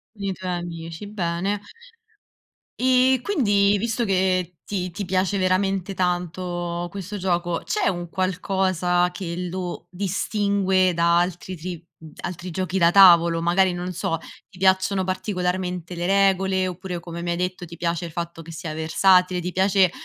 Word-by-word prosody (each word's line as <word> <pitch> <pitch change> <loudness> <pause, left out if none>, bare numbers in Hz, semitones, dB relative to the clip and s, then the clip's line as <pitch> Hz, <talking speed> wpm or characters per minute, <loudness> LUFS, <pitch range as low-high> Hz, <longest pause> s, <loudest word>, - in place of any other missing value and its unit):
Con 200 - -10
i 195 - 0
tuoi 185 0 -5
amici, 170 +1 -6
bene. 195 0 -2 1.2
E 255 0 +4
quindi 205 - +3
visto 230 +2 -1
che 185 -2 +1
ti 185 -3 -3
ti 195 +4 -5
piace 185 +2 0
veramente 190 0 +1
tanto 175 -1 -2
questo 200 +2 -6
gioco, 175 -2 -1
c'è 420 -2 0
un 175 -2 -3
qualcosa 185 -1 0
che 175 -2 -5
lo 180 -2 -5
distingue 190 -1 +1
da 170 +1 +3
altri 180 +1 -2
tri 170 0 -7 0.4
altri 175 +1 -5
giochi 185 +2 -2
da 170 -1 +5
tavolo? 170 -3 +7
Magari 180 +1 +3
non 180 +1 -4
so, 165 -1 -1 0.3
ti 190 - -18
piacciono 190 0 +2
particolarmente 180 -2 -2
le 175 +1 -3
regole 190 -1 +2
oppure, 180 -1 -5
come 170 0 -7
mi 175 - -4
hai - - -1
detto, 180 0 -3
ti 170 +1 -11
piace 170 0 -2
il 165 - -10
fatto 170 0 -5
che 165 +1 -10
sia 160 -1 -6
versatile, 180 +3 +3
ti 180 +1 -3
piace 190 -1 +3
185 Hz, 155 wpm, -23 LUFS, 175-190 Hz, 1.2 s, tavolo